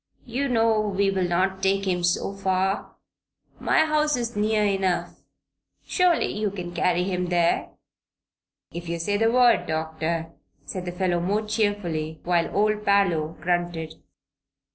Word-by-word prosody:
"You 265 +4 -2
know 225 -2 +3
we'll 195 -2 0
not 190 +2 0
take 195 +1 +1
him 180 -2 0
so 175 +3 0
far. 190 0 -1 0.6
My 315 - +3
house 305 -2 +1
is 235 -2 -3
near 210 0 +1
enough. 195 -3 -1 0.6
Surely 360 -2 +2
you 210 0 0
can 180 -3 -7
carry 175 +1 +1
him 180 -1 -2
there." 175 -1 +1 1.0
"If 170 0 -7
you 170 - -2
say 205 +5 -1
the 225 +2 +3
word, 245 -1 +4
Doctor," 160 +1 -2 0.3
said 185 -1 -5
the 175 - -3
fellow, 180 -1 0
more 200 +5 0
cheerfully, 200 -8 -1
while 170 -1 +1
old 210 0 +2
Parloe 175 -6 +2
grunted. 175 -2 -2
190 Hz, 140 wpm, -25 LUFS, 175-210 Hz, 1.0 s, word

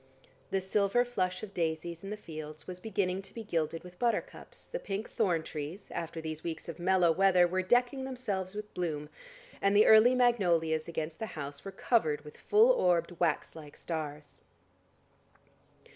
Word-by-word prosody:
The 195 - 0
silver 200 +5 +2
flush 185 -7 -2
of 200 -2 -7
daisies 165 0 -2
in 195 - -6
the 210 - -4
fields 155 -4 -8
was 180 -1 -7
beginning 190 -2 -1
to 195 - -11
be 230 - -5
gilded 165 -5 -2
with 180 0 -13
buttercups, 240 -1 -2
the - - -5
pink 200 - -4
thorn 175 -7 +1
trees, 155 +7 -7
after 165 0 -4
these 160 -1 -5
weeks 165 -2 -5
of 170 - -7
mellow 180 -1 +4
weather 185 0 +5
were 185 +2 0
decking 245 +7 +2
themselves 210 -8 -3
with 210 0 -7
bloom, 155 -4 -3 0.5
and 200 +1 +3
the 210 - +7
early 220 +4 +7
magnolias 175 -11 +2
against 160 -1 -4
the 220 - -3
house 140 -1 -6
were 195 - -6
covered 185 -7 +1
with 150 - -11
full 445 +4 +5
orbed 175 - +2
wax 165 -2 0
like 150 -2 -11
stars. 150 -3 -6
180 Hz, 170 wpm, -31 LUFS, 160-210 Hz, 0.5 s, the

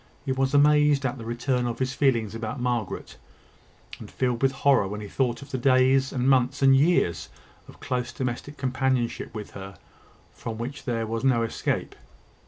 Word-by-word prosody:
He 135 - -1
was 135 +1 0
amazed 150 -1 +4
at 130 0 -2
the 115 - -8
return 120 +1 -1
of 120 -1 -3
his 130 +1 -1
feelings 120 -7 +1
about 115 +2 -5
Margaret, 120 -4 -3 0.8
and - - -10
filled 125 -2 -1
with 135 -1 +3
horror 135 -6 +2
when 105 +2 -5
he 105 - -7
thought 120 +2 -1
of 140 - -14
the 130 - -2
days, 130 +1 +3
and 130 -1 -1
months, 135 +1 +2
and 135 0 +7
years 135 - +2 0.4
of - - -15
close 125 -1 -3
domestic 130 +4 -4
companionship 130 -2 -1
with 105 -2 -7
her, 95 0 -9 0.5
from 110 -1 -7
which 130 +5 -6
there 115 -3 -1
was 115 +2 -3
no 125 -4 +3
escape. 115 - -2
130 Hz, 180 wpm, -25 LUFS, 115-135 Hz, 0.8 s, and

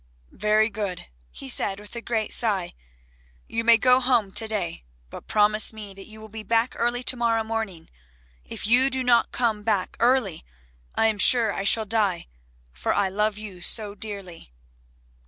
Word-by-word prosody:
"Very 215 +1 +2
good," 200 -4 -5 0.2
he - - -10
said 195 +8 0
with 210 +3 -12
a 235 - -5
great 225 -3 -2
sigh, 200 -7 +2 0.7
"you 230 - -3
may 230 0 +6
go 250 +2 +4
home 245 -6 +1
to 220 +3 +1
day, 190 -6 -3 0.3
but - - -10
promise 210 0 +3
me 210 -3 -10
that 195 0 -12
you 220 0 -12
will 220 - -11
be 220 +1 -8
back 230 +3 +1
early 240 +1 -1
to 255 - +1
morrow 230 -2 +1
morning. 220 -7 -5 0.6
If - - -6
you 250 +5 +5
do 260 -1 0
not 240 -1 +3
come 225 -4 -1
back 205 -3 -1
early 240 -8 +1 0.5
I - - +2
am 220 -2 +1
sure 230 -2 +5
I 195 - -4
shall 220 +2 +3
die 205 -4 0 0.5
for - - -2
I 200 -2 +1
love 210 +2 -1
you 200 -4 -8
so 210 +2 -1
dearly." 195 - -8
215 Hz, 175 wpm, -24 LUFS, 200-230 Hz, 0.7 s, may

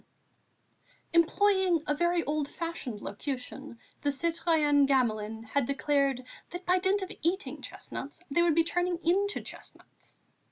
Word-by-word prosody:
VII 335 - +7
Employing 380 -1 +3
a 295 - +1
very 345 +2 +1
old 300 -1 -1
fashioned 330 -10 -5
locution, 260 +3 -6 0.2
the 290 - +1
citoyenne 305 -2 +2
Gamelin 225 -5 +1
had 245 +4 0
declared: 275 -1 +1 0.3
"that 355 +1 -7
by 365 +1 +3
dint 385 +2 +1
of 375 - -6
eating 380 +5 -1
chestnuts 280 +3 -7
they 340 - +3
would 340 -3 +3
be 330 - +5
turning 355 +1 0
into 395 +5 +2
chestnuts." - - -12
320 Hz, 135 wpm, -30 LUFS, 275-355 Hz, 0.3 s, VII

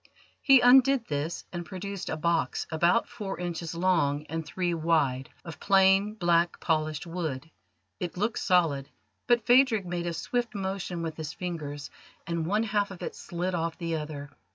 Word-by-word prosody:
He 270 -3 +6
undid 260 0 +6
this 150 +3 -3
and 175 -1 -4
produced 195 +1 -6
a 160 - -2
box, 165 -5 0
about 170 +7 +2
four 210 -6 -6
inches 170 -2 -4
long 165 -5 +1
and 165 0 -3
three 175 +2 -2
wide, 155 -6 +1 0.2
of 165 - -8
plain 195 +1 +4
black 170 -3 +2
polished 155 -1 -1
wood. 165 -4 -4 0.5
It 175 0 -4
looked 210 +4 0
solid, 165 -7 +2 0.4
but 240 -2 +3
Phadrig 245 -5 +4
made 175 0 -3
a 170 - -2
swift 240 +7 -2
motion 190 -3 -3
with 160 -1 -4
his 160 -1 -5
fingers, 150 -5 -5 0.3
and 170 -1 -2
one 210 +4 +1
half 205 -2 0
of 190 -3 -9
it - - -4
slid 175 +2 -4
off 165 -1 -2
the 165 -2 -2
other. 150 -2 -6
175 Hz, 165 wpm, -28 LUFS, 160-195 Hz, 0.5 s, He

